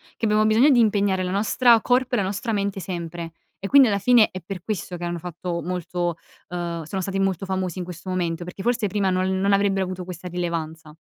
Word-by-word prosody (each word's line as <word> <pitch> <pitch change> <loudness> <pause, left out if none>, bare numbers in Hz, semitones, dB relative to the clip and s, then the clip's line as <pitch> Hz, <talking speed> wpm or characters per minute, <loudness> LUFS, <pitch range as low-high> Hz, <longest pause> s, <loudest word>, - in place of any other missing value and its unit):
che - - -24
abbiamo 215 0 +3
bisogno 220 +7 +5
di 260 -4 +5
impegnare 200 -4 +2
la 180 - -2
nostra 225 +4 +4
corpo 250 +2 +1
e - - +3
la 205 - +1
nostra 200 +4 -2
mente 200 -1 -1
sempre. 170 -2 -6 0.3
E 195 - -4
quindi 270 +1 +7
alla 200 -1 +1
fine 230 +1 +5
è 185 - -6
per 180 0 -7
questo 195 -4 -4
che 175 - -7
hanno 175 0 -2
fatto 175 0 -5
molto 175 0 -2 0.3
uhm, 170 -2 -4
sono 190 +5 -4
stati 195 +1 -2
molto 195 -1 0
famosi 185 -2 -2
in - - -2
questo 180 +1 -8
momento, 175 -2 -2
perché 185 +2 -8
forse 235 -2 +1
prima 200 -1 0
non 185 +1 0
non 200 +1 +2
avrebbero 195 -1 +2
avuto 185 -1 -5
questa 180 0 -7
rilevanza. 165 -3 -4
185 Hz, 220 wpm, -23 LUFS, 175-205 Hz, 0.3 s, quindi